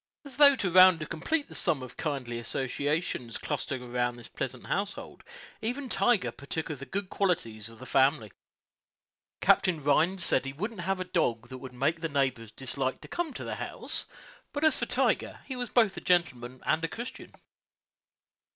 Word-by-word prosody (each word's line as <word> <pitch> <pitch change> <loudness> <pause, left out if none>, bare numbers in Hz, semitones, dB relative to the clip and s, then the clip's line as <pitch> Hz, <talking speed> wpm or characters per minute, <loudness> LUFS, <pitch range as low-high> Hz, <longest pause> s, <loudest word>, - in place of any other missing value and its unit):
As 275 -3 -6
though 285 -1 +9
to 195 -8 -1
round 185 -1 +8
and 155 - -5
complete 285 - -1
the - - -12
sum 155 -8 +1
of 130 - -9
kindly 130 -6 -3
associations 135 +1 -2
clustering 140 -3 -3
around 120 0 -1
this 120 -1 -10
pleasant 130 -1 -5
household, 200 +1 -3 0.4
even 250 +4 -3
Tiger 240 -5 +3
partook 155 +3 -5
of 145 - -6
the 140 - -8
good 200 0 -3
qualities 115 - -1
of 115 - -14
the 130 - -10
family. 130 -6 +2 1.1
Captain 170 -6 +3
Rhines 170 +6 +3
said - - +3
that 135 - -8
he 135 - -4
wouldn't 205 +6 -4
have 190 +2 -1
a - - -1
dog 120 -10 0
that 130 - -7
would 130 0 -9
make 145 +6 0
the 165 - -1
neighbors 130 -6 0
dislike 130 +2 -2
to - - -10
come 345 -3 -2
to - - -5
the - - -4
house; - - -3 0.5
but 290 - -2
as 315 - +5
for - - -2
Tiger, - - 0
he 265 - -5
was 245 -2 -3
both 220 -6 +3
a - - -6
gentleman 130 -9 0
and 160 +1 +1
a - - +1
Christian. 235 +8 -7
155 Hz, 190 wpm, -29 LUFS, 130-195 Hz, 1.1 s, though